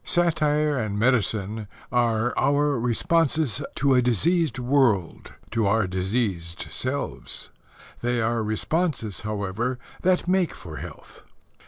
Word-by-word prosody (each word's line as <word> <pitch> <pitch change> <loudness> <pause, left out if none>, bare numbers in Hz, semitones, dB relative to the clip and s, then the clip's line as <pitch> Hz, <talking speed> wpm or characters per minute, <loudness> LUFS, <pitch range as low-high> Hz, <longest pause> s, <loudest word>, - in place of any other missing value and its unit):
Satire 150 -3 +2
and 110 -4 -2
medicine 110 -3 +1 0.2
are 120 -1 +2
our 145 -1 +2
responses 140 +2 +1
to 140 0 +3
a 125 - +5
diseased 145 - +2
world 125 - +1 0.2
to 110 -3 +1
our 110 +1 +3
diseased 95 -2 -2
selves. 130 +2 -3 0.5
They 120 0 0
are 115 +1 +1
responses, 115 - -1
however, 110 +4 -2 0.2
that 180 -1 +2
make 185 -1 +2
for 80 -4 -9
health. - - -10
120 Hz, 115 wpm, -25 LUFS, 105-145 Hz, 0.5 s, a